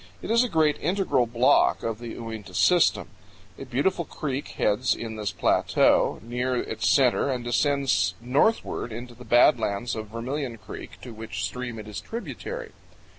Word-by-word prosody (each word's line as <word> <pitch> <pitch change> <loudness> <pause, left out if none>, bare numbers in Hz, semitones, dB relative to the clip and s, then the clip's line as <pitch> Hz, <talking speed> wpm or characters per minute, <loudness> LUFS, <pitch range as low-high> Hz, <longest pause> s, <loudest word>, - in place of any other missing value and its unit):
It - - -3
is 235 +2 +5
a 250 - -2
great 155 -4 +2
integral 155 -8 +1
block 120 +2 +3
of 115 -1 -3
the 120 -1 -7
Uinta 110 -5 -8
system. 175 - +3 0.5
A 135 - -6
beautiful 140 +8 0
creek 140 -3 -4
heads 105 +5 +2
in 115 -1 -6
this 105 -2 -3
plateau, - - +2
near 125 +2 -2
its - - -1
center, 135 0 +3
and 125 -2 -2
descends 140 +3 +1
northward 130 - 0
into 120 +2 -7
the 125 +1 -13
bad 120 +5 +5
lands 105 +4 -2
of 110 -1 -5
Vermilion 120 +3 -4
Creek, - - -10
to 125 - -8
which 105 -5 -6
stream 120 +4 -4
it 110 -1 -8
is 105 -1 -6
tributary. 455 - -6
125 Hz, 165 wpm, -26 LUFS, 115-145 Hz, 0.5 s, is